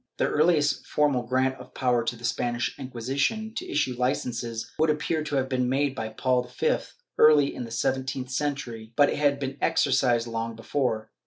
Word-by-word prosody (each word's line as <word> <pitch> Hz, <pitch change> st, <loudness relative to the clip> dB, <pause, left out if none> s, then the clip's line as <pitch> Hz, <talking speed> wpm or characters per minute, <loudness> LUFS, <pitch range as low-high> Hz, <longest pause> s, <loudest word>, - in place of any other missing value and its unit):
^ -, -, -47 dB
The -, -, +2 dB
earhest 150 Hz, -1 st, +2 dB
formal 145 Hz, -4 st, +2 dB
grant 130 Hz, +1 st, +1 dB
of -, -, -13 dB
power 125 Hz, -3 st, +2 dB
to 120 Hz, -, -1 dB
the 120 Hz, -, -15 dB
Spanish 120 Hz, -1 st, -1 dB
Inquisition 135 Hz, -, -2 dB
to -, -, -5 dB
issue 145 Hz, -3 st, 0 dB
licences 120 Hz, -2 st, -2 dB
would 160 Hz, 0 st, +3 dB
appear 155 Hz, +1 st, 0 dB
to 150 Hz, -1 st, -3 dB
have 135 Hz, -1 st, +1 dB
been 125 Hz, -1 st, 0 dB
made 140 Hz, +1 st, +1 dB
by 110 Hz, -4 st, -4 dB
Paul 125 Hz, +3 st, +1 dB, 0.2 s
V 475 Hz, -, +2 dB, 0.4 s
early 150 Hz, -2 st, +6 dB
in 125 Hz, -, -5 dB
the -, -, -9 dB
seventeenth 130 Hz, +2 st, -2 dB
century,' 125 Hz, -6 st, -3 dB
but 145 Hz, -1 st, +5 dB
it -, -, -2 dB
had 145 Hz, -1 st, +2 dB
been 135 Hz, 0 st, -4 dB
exercised 125 Hz, -4 st, +2 dB
long 115 Hz, 0 st, -4 dB
before. 115 Hz, -1 st, -2 dB
130 Hz, 185 wpm, -26 LUFS, 120-145 Hz, 0.4 s, early